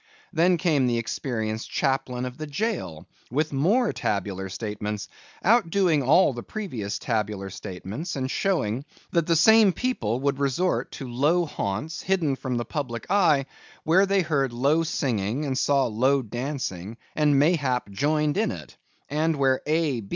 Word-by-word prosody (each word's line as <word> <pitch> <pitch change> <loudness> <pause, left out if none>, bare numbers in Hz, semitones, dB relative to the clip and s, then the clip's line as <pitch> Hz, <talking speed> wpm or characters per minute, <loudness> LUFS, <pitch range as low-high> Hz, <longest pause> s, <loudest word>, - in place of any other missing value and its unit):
Then 175 +2 +3
came 150 -6 +2
the 120 -1 +1
experienced 110 -2 -3
chaplain 130 -2 -1
of 125 -1 -6
the 155 - -4
jail, 145 - -3 0.2
with 150 +4 -1
more 205 - +2
tabular 95 -1 -2
statements, 105 0 -4 0.4
outdoing 190 -7 +3
all 145 +3 +4
the 120 - -6
previous 120 - -4
tabular 105 -4 -2
statements, 100 - -6
and 130 -1 -2
showing 135 - 0 0.3
that 170 -3 +1
the 165 - +3
same 220 +4 +6
people 130 - -1
would 140 0 0
resort 140 +7 0
to 135 - -6
low 150 +9 +2
haunts, 145 +3 -4
hidden 170 -7 +1
from 130 -2 -3
the 120 - -2
public 125 -7 -4
eye, 160 -9 +4 0.4
where 185 +5 +4
they 195 0 +3
heard 140 -6 0
low 140 +7 +2
singing 130 -5 -1
and 135 -2 -1
saw 140 0 +2
low 130 +4 +2
dancing, 115 -5 -4 0.2
and 150 -2 +3
mayhap 140 -6 +2
joined 150 - +1
in 220 - +2
it; 80 - -8 0.3
and 155 +2 0
where 135 -2 +2
A. 150 -8 0
140 Hz, 150 wpm, -25 LUFS, 115-165 Hz, 0.4 s, same